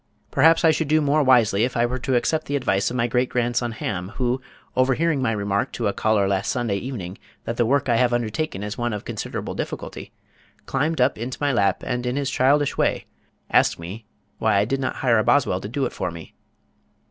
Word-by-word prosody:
Perhaps 165 +1 +4
I 160 - +7
should 155 0 -1
do 155 +2 +3
more 150 0 +2
wisely 120 -6 +4
if 125 0 -1
I 120 - +3
were 125 +2 -3
to 130 +1 -1
accept 155 +6 0
the 145 - -1
advice 100 -8 +1
of 125 - -5
my 120 -2 +1
great 125 +1 +1
grandson 120 0 0
Ham, 95 -4 -4
who, 125 +1 -1 0.3
overhearing 135 +4 +2
my 130 - +1
remark 100 +3 -1
to 120 - -3
a 100 - 0
caller 110 -2 +1
last 95 +1 0
Sunday 115 -5 -1
evening 100 -6 -6 0.2
that 115 - -3
the 120 -1 +1
work 140 +2 +2
I 120 -2 +3
have 125 0 +3
undertaken 120 -1 -2
is 105 +2 -5
one 120 -1 -1
of 105 - -5
considerable - - -5
difficulty, - - -6 0.5
climbed 150 +3 -1
up 125 -2 +2
into 125 +3 -4
my 145 -1 +1
lap 100 -4 +1
and 125 0 -2
in 125 - -1
his 140 -1 -1
childish 140 +2 +2
way - - +1 0.5
asked - - +3
me 95 +7 -8 0.3
why - - +2
I 100 +1 +3
did 135 +5 -1
not 130 -1 -2
hire 120 -4 +2
a - - +2
boswell 105 -10 +2
to 100 - -6
do 135 +3 -1
it - - -4
for - - -3
me. 85 -1 -10
120 Hz, 220 wpm, -23 LUFS, 105-135 Hz, 0.5 s, I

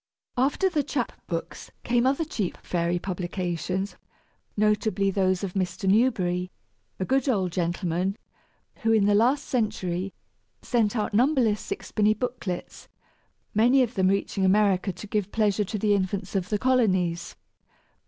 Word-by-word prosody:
After 275 +9 +2
the 315 -5 +1
chap 260 -3 -2 0.2
books 165 -2 -5
came 240 +1 +2
other 280 +5 +1
cheap 210 - -3
fairy 175 0 0
publications, 180 +1 -3 0.6
notably 210 -2 +2
those 185 -1 +1
of 190 -3 -3
Mr. 190 +1 -2
Newberry, 190 -5 +2 0.5
a 185 - -1
good 270 +3 +1
old 190 -7 +1
gentleman 175 +2 -1 0.6
who, 225 - 0
in 215 -3 +4
the 205 - +4
last 255 +7 +3
century, 195 -6 -1 0.5
sent 230 -3 +1
out 210 -3 -1
numberless 240 -3 +3
sixpenny 215 0 0
booklets, 215 -7 -5 0.7
many 245 +5 +5
of 240 -1 -3
them 190 -5 +2
reaching 195 0 0
America 195 0 +3
to 180 +4 -9
give 205 -1 -2
pleasure 210 -2 +1
to 210 - -3
the 210 0 +2
infants 195 0 -2
of 190 -1 -1
the 210 - +1
colonies. 185 -9 +1
205 Hz, 140 wpm, -26 LUFS, 185-230 Hz, 0.7 s, many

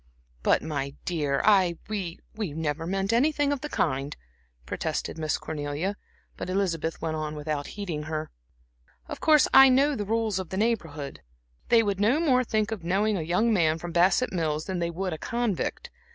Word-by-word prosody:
"But, - - +3
my 140 -3 -3
dear, 145 -6 0
I 190 -5 +4
we 195 -6 -4 0.2
never 160 -5 -3
meant 195 +3 0
anything 290 +3 +2
of 275 - -4
the 300 - -5
kind," 135 - -1 0.5
protested 110 - -3
Miss 155 -1 0
Cornelia. 150 +6 -3 0.4
But - - -5
Elizabeth 170 -4 -1
went 160 -1 -1
on 155 0 -4
without 150 -1 -3
heeding 175 -7 -3
her. 155 0 -3 0.8
"Of - - -6
course 305 -3 +5
I 270 0 +9
know 275 +3 +3
the 210 - -2
rules 220 -1 0
of 185 - -5
the 190 - -4
Neighborhood. 160 - -2 0.5
They 230 -1 +6
would 200 -2 -1
no 230 +9 +3
more 260 -6 +3
think 215 -2 0
of 210 -6 -4
knowing 200 +5 +1
a 180 - -1
young 180 +8 +2
man 160 -5 +3
from 170 +1 -6
Bassett 185 +9 +3
Mills 155 -3 -1
than 190 -2 -3
they 170 0 -1
would 180 +1 -3
a 155 - -6
convict. 235 -5 -2
185 Hz, 180 wpm, -27 LUFS, 155-220 Hz, 0.8 s, I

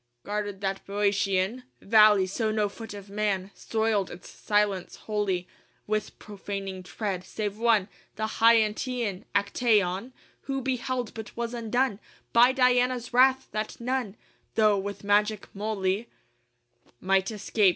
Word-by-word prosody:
VI - - -14
Guarded 205 -1 -3
that 195 0 -2
Bœotian 200 +2 +1 0.2
Valley 210 -2 +6
so 215 +4 -1
no 215 -1 +1
foot 225 0 -9
of 200 -1 -9
man 200 -2 -1
Soiled 220 -3 0
its 175 - -11
silence 205 -3 0
holy 200 -4 -2 0.4
With 215 0 -2
profaning 195 -2 -6
tread 185 +1 -4
save 205 +2 -4
one, 225 -4 +3 0.3
The 220 - -2
Hyantian: 225 -1 +2
Actæon, 200 0 +1 0.4
Who 270 0 0
beheld 255 -2 -2
but 220 0 -9
was 235 0 -3
undone 235 -1 0 0.3
By 240 +2 +7
Diana's 250 -1 +2
wrath, 260 +1 +4
that 215 0 -4
none 240 -4 -2 0.4
'Though 215 -2 +4
with 200 +1 -5
magic 210 0 +2
moly, 200 -1 -1
VII 235 - -18 0.9
Might 195 0 +2
escape. 210 -1 +2
210 Hz, 130 wpm, -27 LUFS, 195-230 Hz, 0.9 s, By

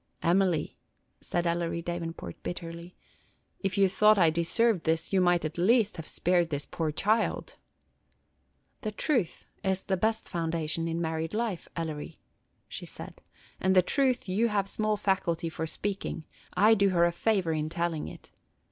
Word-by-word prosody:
"Emily," 180 -1 +1 0.4
said 175 0 -2
Ellery 170 0 -1
Davenport, 165 - -5
bitterly, 170 0 -6 0.6
"if 195 -1 -2
you 195 -1 +5
thought 210 +3 +5
I 170 -4 +5
deserved 175 +4 +2
this, 160 +3 0
you 190 - +4
might, 175 -2 +3
at 155 +2 -4
least, 215 +2 +3
have 160 - -7
spared 175 -1 +1
this 145 -1 -3
poor 160 -2 -2
child." 215 +8 0 1.3
"The 215 - -3
truth 220 - -1 0.2
is 190 0 0
the 190 - 0
best 220 +4 0
foundation 165 -1 -1
in 165 0 -2
married 160 +2 -2
life, 220 -6 -2
Ellery," 155 -3 -5 0.5
she - - -7
said, - - -9 0.4
"and 190 0 +2
the 185 - +7
truth 260 +1 +1
you 205 +6 +2
have 205 -3 0
small 215 +1 0
faculty 175 -5 0
for 160 0 -4
speaking. 195 -2 -4 0.3
I 210 +4 +6
do 200 -2 +4
her 170 -2 +4
a 175 - +2
favor 185 -2 +1
in 155 0 -1
telling 170 -2 -2
it. - - -12
175 Hz, 155 wpm, -29 LUFS, 165-200 Hz, 1.3 s, the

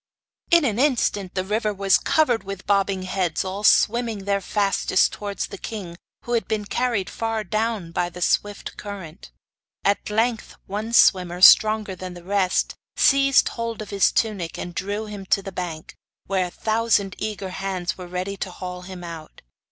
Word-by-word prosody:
In 340 -3 +5
an 225 -3 0
instant 230 -9 +1
the 185 - 0
river 215 +2 0
was 195 -1 +3
covered 255 -8 +2
with 195 -1 -7
bobbing 195 -2 +1
heads 185 -2 -1
all 190 +2 -4
swimming 225 -2 +3
their 200 0 +1
fastest 195 -1 +1
towards 200 -1 -4
the - - -9
king, 195 -6 -6 0.3
who 240 - -4
had 230 - 0
been 215 -2 -2
carried 230 -3 -1
far 225 0 -2
down 215 -3 -2
by 175 +1 -1
the 175 - -10
swift 205 +3 -1
current. 190 - -9 0.5
At 200 +1 +1
length 225 +1 0
one 210 +3 -4
swimmer, 180 -5 +4
stronger 215 +1 +6
than 185 -1 -7
the 175 - -11
rest, 190 0 +1 0.2
seized 275 -1 +4
hold 230 -1 -4
of 215 -1 -7
his 200 -2 +3
tunic, 200 -7 -1
and 175 - -6
drew 205 +4 -3
him 205 -2 -8
to 195 - +2
the 195 - -6
bank, 170 -4 -6 0.3
where 185 -2 0
a - - -8
thousand 215 -1 +1
eager 210 -3 -4
hands 190 -2 -3
were 180 -1 -9
ready 185 +2 -4
to 190 - -4
haul 180 0 -7
him 180 -1 -9
out. 165 -2 -9
200 Hz, 175 wpm, -23 LUFS, 185-220 Hz, 0.5 s, stronger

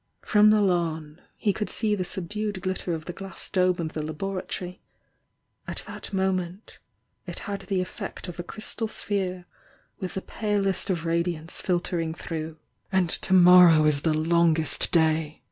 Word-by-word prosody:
From 210 -1 +5
the 215 0 +5
lawn, 160 -5 -1 0.2
he 205 - +1
couH 210 - -3
see 215 -2 +1
the 195 -3 0
subdued 205 +3 -3
glitter 185 -2 -2
of 155 -1 -8
the 175 - -5
glass 195 +1 -6
dome 185 -1 +2
of 160 -2 -4
the 155 - -3
laboratory 180 +3 -4 0.9
at - - -4
that - - -8
moment 190 0 -2 0.5
it - - -6
had 200 -1 -4
the 195 -3 0
effect 185 - -6
of 175 0 -8
a - - -2
crystal 215 +4 -4
sphere 185 -4 -1 0.5
with 185 - -5
the 190 - -3
palest 200 -2 -1
of 170 -3 -1
radiance 170 0 -1
filtering 175 -3 -1
through. 160 -2 -5 0.3
"And 185 -3 +2
to 190 - +1
morrow 175 -3 +8
is 150 -2 +2
the 160 - +1
longest 165 -1 +2
day!" 160 -2 +2
180 Hz, 160 wpm, -26 LUFS, 165-195 Hz, 0.9 s, morrow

